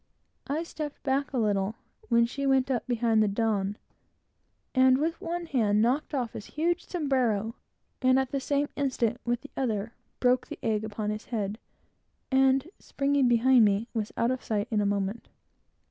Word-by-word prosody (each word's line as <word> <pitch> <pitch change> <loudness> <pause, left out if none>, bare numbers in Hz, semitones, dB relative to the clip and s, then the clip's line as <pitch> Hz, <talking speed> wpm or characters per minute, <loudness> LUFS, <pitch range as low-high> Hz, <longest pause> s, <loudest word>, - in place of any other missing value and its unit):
I 305 +4 -1
stepped 305 -3 -7
back 275 0 0
a 265 - -2
little, 205 -2 +1 0.3
when 235 -1 +5
she 275 +3 -3
went 270 0 +3
up 245 - -1
behind 230 -2 +2
the 215 - +3
Don, 205 -1 0 1.0
and 260 0 +5
with 320 +4 -1
one 345 +1 -3
hand 220 -9 +2
knocked 275 +5 0
off 245 -4 -2
his 205 - -8
huge 340 +2 0
sombrero, 250 - 0 0.5
and 255 0 +4
at 265 -1 0
the 275 - 0
same 285 +2 0
instant, 245 -4 0
with 240 0 0
the 290 - -12
other, 225 -4 -2 0.3
broke 250 0 +2
the - - -7
egg 220 -2 0
upon 215 -1 -3
his 215 +1 -5
head, 210 -2 -3 0.7
and 265 +2 +3
springing 280 -1 +1
behind 240 +1 +5
me, 205 +3 +2
was 220 -3 -2
out 235 +2 +2
of 255 - -3
sight 210 0 -1
in 215 -2 +2
a 205 - +1
moment. 200 +2 -2
245 Hz, 175 wpm, -28 LUFS, 215-270 Hz, 1.0 s, when